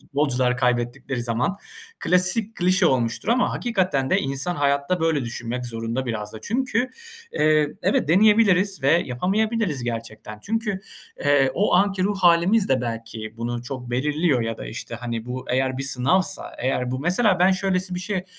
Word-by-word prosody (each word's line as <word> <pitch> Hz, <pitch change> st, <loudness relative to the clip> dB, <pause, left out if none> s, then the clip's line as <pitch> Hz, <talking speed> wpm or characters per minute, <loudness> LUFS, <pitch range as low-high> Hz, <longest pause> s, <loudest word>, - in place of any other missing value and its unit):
futbolcular 130 Hz, -3 st, 0 dB
kaybettikleri 120 Hz, 0 st, -1 dB
zaman. 120 Hz, -, -1 dB, 0.4 s
Klasik, 190 Hz, +5 st, +3 dB
klişe 185 Hz, +1 st, +3 dB
olmuştur 120 Hz, -, 0 dB
ama 245 Hz, +2 st, +2 dB
hakikaten 185 Hz, -, 0 dB
de -, -, +4 dB
insan 140 Hz, +6 st, -2 dB
hayatta 140 Hz, +4 st, 0 dB
böyle 160 Hz, -5 st, +1 dB
düşünmek 120 Hz, +1 st, -5 dB
zorunda 115 Hz, +2 st, -3 dB
biraz 105 Hz, -3 st, -4 dB
da. 110 Hz, -, -9 dB
Çünkü, 255 Hz, -, -1 dB, 0.4 s
eee, 150 Hz, -1 st, +2 dB
evet, -, -, +1 dB
deneyebiliriz 200 Hz, -1 st, +4 dB
ve 140 Hz, -, +4 dB
yapamayabiliriz 180 Hz, -, 0 dB
gerçekten. 115 Hz, -2 st, -6 dB
Çünkü, 220 Hz, -3 st, -2 dB, 0.4 s
eee, 145 Hz, -2 st, +3 dB
o 205 Hz, -1 st, +2 dB
anki 195 Hz, 0 st, +2 dB
ruh 200 Hz, +1 st, 0 dB
hâlimiz 180 Hz, +4 st, +4 dB
de 130 Hz, -2 st, +2 dB
belki 115 Hz, -2 st, -6 dB
bunu 120 Hz, +1 st, -4 dB
çok 125 Hz, -1 st, -7 dB
belirliyor 145 Hz, +2 st, +1 dB
ya 115 Hz, -1 st, -4 dB
da, -, -, -7 dB
işte, -, -, -7 dB
hani, 115 Hz, -1 st, -5 dB
bu 125 Hz, +1 st, -5 dB
eğer 130 Hz, +1 st, 0 dB
bir -, -, -2 dB
sınavsa 140 Hz, +8 st, 0 dB
eğer 125 Hz, -1 st, -1 dB
bu 130 Hz, -, -2 dB
Mesela 185 Hz, -, +2 dB
ben, 180 Hz, +2 st, +5 dB
şöylesi 185 Hz, -1 st, -1 dB
bir 180 Hz, -, -3 dB
şey, 185 Hz, -1 st, -3 dB
145 Hz, 160 wpm, -23 LUFS, 125-185 Hz, 0.4 s, ben